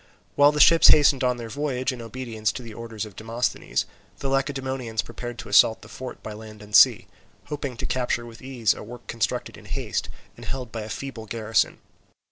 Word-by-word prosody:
While 145 Hz, +1 st, +6 dB
the 150 Hz, -, -2 dB
ships 165 Hz, +2 st, +8 dB
hastened 140 Hz, -3 st, +6 dB
on 125 Hz, -1 st, +2 dB
their 120 Hz, -1 st, -6 dB
voyage 130 Hz, 0 st, -2 dB
in 125 Hz, -2 st, -7 dB
obedience 115 Hz, -2 st, -3 dB
to 125 Hz, -, -7 dB
the 115 Hz, -2 st, -9 dB
orders 115 Hz, -1 st, -6 dB
of 105 Hz, -3 st, -12 dB
Demosthenes, 115 Hz, +2 st, -1 dB, 0.3 s
the 135 Hz, -, -3 dB
Lacedaemonians 130 Hz, -4 st, -1 dB
prepared 120 Hz, 0 st, -7 dB
to -, -, -8 dB
assault 110 Hz, -, +5 dB
the -, -, -12 dB
fort 130 Hz, -1 st, -8 dB
by 110 Hz, -, -6 dB
land 110 Hz, 0 st, -11 dB
and 105 Hz, 0 st, -4 dB
sea, -, -, +7 dB, 0.4 s
hoping 140 Hz, -4 st, -4 dB
to -, -, -3 dB
capture 120 Hz, -2 st, -1 dB
with 115 Hz, -1 st, -12 dB
ease 125 Hz, -5 st, +1 dB
a -, -, -10 dB
work 120 Hz, +2 st, -10 dB
constructed 115 Hz, -2 st, -2 dB
in -, -, -14 dB
haste, -, -, -3 dB, 0.3 s
and -, -, -11 dB
held 125 Hz, -3 st, -5 dB
by 115 Hz, -, -4 dB
a 105 Hz, -, -7 dB
feeble 115 Hz, -2 st, -6 dB
garrison. 110 Hz, 0 st, 0 dB
120 Hz, 200 wpm, -25 LUFS, 110-130 Hz, 0.4 s, ships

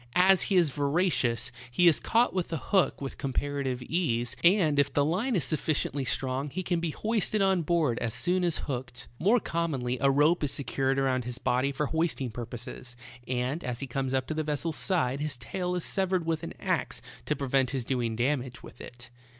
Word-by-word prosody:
As 185 Hz, +1 st, +5 dB
he 195 Hz, -, 0 dB
is 170 Hz, -5 st, +4 dB
voracious, 140 Hz, -5 st, +1 dB, 0.2 s
he 175 Hz, +9 st, +3 dB
is 160 Hz, -, +5 dB
caught 235 Hz, +2 st, +2 dB
with 185 Hz, -3 st, -2 dB
a 165 Hz, -, -1 dB
hook 190 Hz, +5 st, +1 dB
with 135 Hz, -, -6 dB
compar 140 Hz, +1 st, -2 dB
ative 125 Hz, -1 st, -3 dB
ease, 120 Hz, -8 st, -1 dB
and 170 Hz, -5 st, +4 dB
if 140 Hz, 0 st, +3 dB
the 145 Hz, -, +2 dB
line 210 Hz, -, 0 dB
is 175 Hz, -, +1 dB
sufficiently 145 Hz, -3 st, -1 dB
strong 130 Hz, +2 st, -1 dB
he 185 Hz, +7 st, -4 dB
can 175 Hz, -1 st, 0 dB
be 170 Hz, 0 st, -1 dB
hoisted 215 Hz, +4 st, 0 dB
on 190 Hz, -2 st, +3 dB
board 160 Hz, -7 st, +1 dB
as 115 Hz, -1 st, -2 dB
soon 180 Hz, +7 st, +1 dB
as 170 Hz, -2 st, +2 dB
hooked. 125 Hz, -3 st, -5 dB
More 215 Hz, +8 st, +4 dB
commonly 140 Hz, -, -2 dB
a 140 Hz, -, +4 dB
rope 150 Hz, +5 st, +3 dB
is 145 Hz, -, 0 dB
secured 135 Hz, -1 st, -1 dB
around 130 Hz, -2 st, +1 dB
his 125 Hz, 0 st, -4 dB
body 130 Hz, +2 st, +1 dB
for 150 Hz, +2 st, -1 dB
hoisting 160 Hz, -5 st, -1 dB
purposes, 120 Hz, +1 st, -7 dB, 0.3 s
and 130 Hz, +6 st, -2 dB
as 125 Hz, -1 st, -3 dB
he 140 Hz, -, -3 dB
comes 135 Hz, +1 st, -2 dB
up 130 Hz, -1 st, 0 dB
to 155 Hz, -, -3 dB
the 155 Hz, -, -1 dB
vessel's 150 Hz, +1 st, -1 dB
side 140 Hz, -9 st, +1 dB
his 150 Hz, -3 st, -2 dB
tail 180 Hz, +8 st, -3 dB
is 180 Hz, -, -2 dB
severed 190 Hz, -3 st, 0 dB
with 160 Hz, -1 st, -1 dB
an -, -, -7 dB
ax -, -, -1 dB, 0.2 s
to 150 Hz, -, +1 dB
pre 135 Hz, -2 st, -4 dB
vent 130 Hz, -1 st, +3 dB
his 130 Hz, -4 st, -3 dB
doing 120 Hz, -3 st, -1 dB
damage 125 Hz, 0 st, -1 dB
with -, -, -12 dB
it. 120 Hz, 0 st, -10 dB
145 Hz, 205 wpm, -28 LUFS, 130-170 Hz, 0.3 s, As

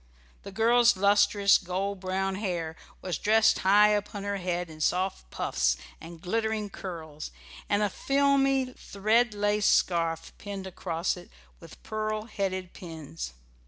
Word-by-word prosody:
The 200 Hz, -, -9 dB
girl's 235 Hz, +2 st, +4 dB
lustrous 200 Hz, 0 st, +4 dB
gold 190 Hz, +2 st, -3 dB
brown 190 Hz, +1 st, -1 dB
hair 175 Hz, -5 st, -3 dB, 0.3 s
was 180 Hz, -4 st, -2 dB
dressed 220 Hz, +1 st, +4 dB
high 205 Hz, +2 st, +6 dB
upon 205 Hz, -1 st, -1 dB
her 200 Hz, 0 st, -2 dB
head 180 Hz, -1 st, -2 dB
in 155 Hz, -1 st, -11 dB
soft 180 Hz, -, 0 dB
puffs -, -, 0 dB, 0.2 s
and 165 Hz, 0 st, -10 dB
glittering 220 Hz, +3 st, -1 dB
curls, 160 Hz, -6 st, -7 dB, 0.4 s
and 205 Hz, 0 st, +2 dB
a 205 Hz, -, +2 dB
filmy 275 Hz, -1 st, +2 dB
thread 215 Hz, +3 st, +1 dB
lace 205 Hz, 0 st, +1 dB
scarf 165 Hz, -2 st, +1 dB
pinned 200 Hz, -1 st, -6 dB
across 175 Hz, -2 st, -2 dB
it 175 Hz, -, -12 dB, 0.3 s
with -, -, -14 dB
pearl 215 Hz, 0 st, -2 dB
headed 190 Hz, -4 st, -3 dB
pins. 145 Hz, -, -8 dB
195 Hz, 135 wpm, -28 LUFS, 175-210 Hz, 0.4 s, high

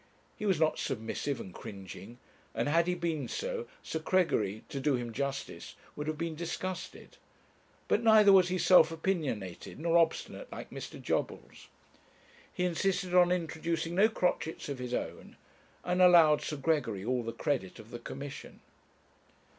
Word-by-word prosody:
He 215 Hz, -, -4 dB
was 190 Hz, -5 st, +2 dB
not 160 Hz, -1 st, +2 dB
submissive 130 Hz, +2 st, -3 dB
and 95 Hz, -, -8 dB
cringing; 100 Hz, +4 st, -9 dB, 0.4 s
and -, -, 0 dB
had 165 Hz, +3 st, +3 dB
he 180 Hz, -, +1 dB
been 165 Hz, -6 st, -2 dB
so, 485 Hz, -, -4 dB, 0.2 s
Sir 160 Hz, -, -3 dB
Gregory, 155 Hz, -, +1 dB
to 140 Hz, -, -4 dB
do 140 Hz, 0 st, +2 dB
him 120 Hz, -2 st, -4 dB
justice, 140 Hz, +2 st, -4 dB, 0.2 s
would 150 Hz, 0 st, -5 dB
have 155 Hz, -1 st, -2 dB
been 165 Hz, 0 st, -3 dB
disgusted; 175 Hz, +3 st, -6 dB, 0.7 s
but 215 Hz, -, +2 dB
neither 215 Hz, -3 st, +7 dB
was 185 Hz, -2 st, +6 dB
he 185 Hz, +1 st, -1 dB
self 180 Hz, -3 st, +6 dB
opinionated 155 Hz, -, -3 dB
nor 170 Hz, +1 st, +3 dB
obstinate 165 Hz, -, -1 dB
like -, -, -8 dB
Mr. -, -, -8 dB
Jobbles. -, -, -3 dB, 0.8 s
He 180 Hz, -, -1 dB
insisted 180 Hz, +1 st, 0 dB
on 180 Hz, -1 st, +6 dB
introducing 165 Hz, -1 st, -2 dB
no 200 Hz, +5 st, +5 dB
crotchets 165 Hz, -7 st, -1 dB
of 140 Hz, -2 st, -4 dB
his 125 Hz, -1 st, -3 dB
own, -, -, -6 dB, 0.5 s
and 180 Hz, +1 st, +1 dB
allowed 170 Hz, -4 st, +7 dB
Sir 150 Hz, -, -4 dB
Gregory 135 Hz, -10 st, 0 dB
all 125 Hz, +1 st, 0 dB
the 115 Hz, 0 st, -4 dB
credit 115 Hz, -4 st, -2 dB
of 110 Hz, +1 st, -13 dB
the 120 Hz, -, -6 dB
Commission. 140 Hz, +3 st, -8 dB
160 Hz, 155 wpm, -31 LUFS, 130-180 Hz, 0.8 s, neither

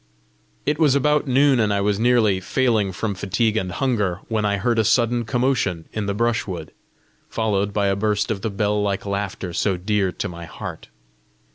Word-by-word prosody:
It 150 Hz, +1 st, 0 dB
was 150 Hz, -4 st, +4 dB
about 150 Hz, +1 st, +2 dB
noon, 135 Hz, 0 st, +4 dB
and 110 Hz, -2 st, +2 dB
I 100 Hz, -, +1 dB
was 100 Hz, 0 st, 0 dB
nearly 115 Hz, -5 st, +3 dB
failing 110 Hz, -1 st, +1 dB
from 105 Hz, +3 st, -3 dB
fatigue 100 Hz, +4 st, 0 dB
and 95 Hz, -4 st, -1 dB
hunger, 105 Hz, -5 st, 0 dB
when 110 Hz, -2 st, 0 dB
I 100 Hz, -1 st, +1 dB
heard 115 Hz, +3 st, +1 dB
a -, -, +4 dB
sudden 120 Hz, +2 st, +2 dB
commotion 120 Hz, -9 st, 0 dB
in 105 Hz, -2 st, -3 dB
the 100 Hz, -, -1 dB
brushwood, 105 Hz, -8 st, -1 dB, 0.6 s
followed 105 Hz, -2 st, 0 dB
by 100 Hz, 0 st, 0 dB
a 100 Hz, 0 st, +2 dB
burst 105 Hz, +2 st, 0 dB
of 100 Hz, -3 st, -3 dB
the 110 Hz, -, -1 dB
bell 105 Hz, 0 st, 0 dB
like 100 Hz, -1 st, -1 dB
laughter 100 Hz, -2 st, -3 dB
so 95 Hz, +1 st, 0 dB
dear 100 Hz, 0 st, 0 dB
to -, -, -4 dB
my 85 Hz, -1 st, -8 dB
heart. -, -, -8 dB
105 Hz, 185 wpm, -22 LUFS, 100-120 Hz, 0.6 s, was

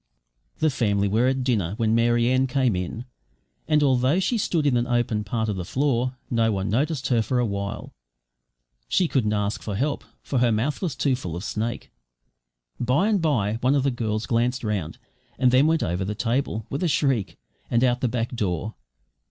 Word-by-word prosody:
The 155 Hz, -1 st, +2 dB
family 100 Hz, -6 st, +1 dB
were 110 Hz, +5 st, +2 dB
at 130 Hz, 0 st, 0 dB
dinner 105 Hz, -8 st, 0 dB
when 110 Hz, -2 st, +1 dB
Mary 120 Hz, +1 st, +3 dB
Ann 130 Hz, +1 st, +2 dB
came 125 Hz, -4 st, +1 dB
in, 90 Hz, +7 st, -4 dB, 0.6 s
and, 150 Hz, -1 st, +3 dB
although 130 Hz, +4 st, +3 dB
she 190 Hz, +6 st, 0 dB
stood 170 Hz, -8 st, 0 dB
on 140 Hz, -4 st, +3 dB
an 120 Hz, 0 st, +1 dB
open 120 Hz, -3 st, 0 dB
part 110 Hz, +2 st, -2 dB
of 105 Hz, -3 st, -2 dB
the 90 Hz, -, -3 dB
floor, 130 Hz, -, 0 dB
no 115 Hz, -2 st, +1 dB
one 95 Hz, 0 st, -2 dB
noticed 135 Hz, +5 st, 0 dB
her 120 Hz, -3 st, +3 dB
for 125 Hz, +3 st, -1 dB
a 125 Hz, -, +2 dB
while. 100 Hz, -1 st, -4 dB, 1.0 s
She 185 Hz, -, +2 dB
couldn't 120 Hz, -8 st, +1 dB
ask 105 Hz, 0 st, -1 dB
for 105 Hz, -, -4 dB
help, 140 Hz, +7 st, -1 dB, 0.2 s
for 135 Hz, -, -1 dB
her 120 Hz, -1 st, +3 dB
mouth 115 Hz, +7 st, -1 dB
was 170 Hz, -9 st, -2 dB
too 135 Hz, -1 st, +1 dB
full 90 Hz, -10 st, -6 dB
of 90 Hz, -, -5 dB
snake. 110 Hz, +2 st, -4 dB, 0.9 s
By 130 Hz, -, +2 dB
and 205 Hz, -4 st, +2 dB
bye 115 Hz, -9 st, 0 dB
one 130 Hz, +3 st, +3 dB
of 140 Hz, -, +2 dB
the 140 Hz, -, +2 dB
girls 110 Hz, -2 st, -2 dB
glanced 125 Hz, +2 st, 0 dB
round, 100 Hz, -7 st, -2 dB, 0.4 s
and 125 Hz, -1 st, +3 dB
then 130 Hz, +4 st, +5 dB
went 160 Hz, 0 st, +2 dB
over 90 Hz, +2 st, -1 dB
the 105 Hz, +2 st, -3 dB
table, 115 Hz, -1 st, -1 dB
with 140 Hz, -, -2 dB
a 180 Hz, -, +2 dB
shriek, 135 Hz, -, 0 dB, 0.3 s
and 120 Hz, +1 st, +2 dB
out 125 Hz, -1 st, +3 dB
of -, -, -24 dB
the 125 Hz, -, +2 dB
back 120 Hz, +1 st, -2 dB
door. 105 Hz, 0 st, -2 dB
120 Hz, 200 wpm, -24 LUFS, 105-135 Hz, 1.0 s, then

